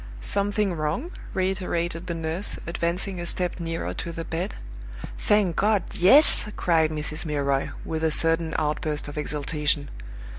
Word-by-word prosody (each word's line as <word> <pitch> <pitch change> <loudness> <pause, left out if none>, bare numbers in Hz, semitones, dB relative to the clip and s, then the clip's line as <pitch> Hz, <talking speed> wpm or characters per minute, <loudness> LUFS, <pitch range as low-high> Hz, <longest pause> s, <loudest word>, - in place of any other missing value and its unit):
"Something 200 - +1
wrong?" 160 - -2 0.2
reiterated 180 -2 -1
the 170 - -2
nurse, 165 +4 -2
advancing 175 +3 -1
a 175 - -4
step 180 0 -1
nearer 165 -1 -3
to 170 - -5
the 165 0 -5
bed. 165 - -3 0.6
"Thank 205 -5 +2
God 210 -1 +2
yes!" 210 - +6
cried 160 -3 +2
Mrs. 155 0 -2
Milroy, 140 -3 0 0.2
with 160 0 -3
a 160 - +3
sudden 165 +1 +3
outburst 150 -1 -1
of 145 - -8
exultation. 150 -1 -1
165 Hz, 140 wpm, -25 LUFS, 155-185 Hz, 0.6 s, yes